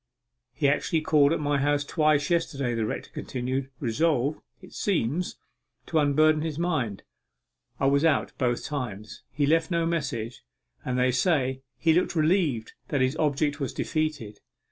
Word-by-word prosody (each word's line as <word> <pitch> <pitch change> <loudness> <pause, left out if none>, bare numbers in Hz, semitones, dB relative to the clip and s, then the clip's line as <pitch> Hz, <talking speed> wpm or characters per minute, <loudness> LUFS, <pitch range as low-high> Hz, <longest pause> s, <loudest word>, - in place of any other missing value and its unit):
'He 140 - 0
actually 150 +3 +1
called 150 -2 +4
at 165 - +1
my 145 -1 0
house 145 +1 +1
twice 155 0 +2
yesterday,' 140 -7 0
the 115 -2 -1
rector - - -5
continued, 130 +1 -3
'resolved, 140 +3 0 0.2
it 185 0 -15
seems, 175 - -1 0.5
to 160 - +1
unburden 155 +1 +3
his 155 -2 -3
mind. 150 - -1 0.8
I - - +1
was 140 +2 +3
out 160 -5 +2
both 120 -1 0
times 110 -7 -5
he 145 - 0
left 160 +2 +2
no 170 -2 +1
message, 135 -9 -3 0.4
and, 125 0 -2
they 125 0 +3
say, 130 -1 +1 0.2
he 165 -1 +3
looked 175 +1 +1
relieved 155 - +1
that 140 - 0
his 130 +3 +2
object 150 0 0
was 135 -4 -3
defeated. 150 -10 -2
145 Hz, 155 wpm, -26 LUFS, 130-160 Hz, 0.8 s, called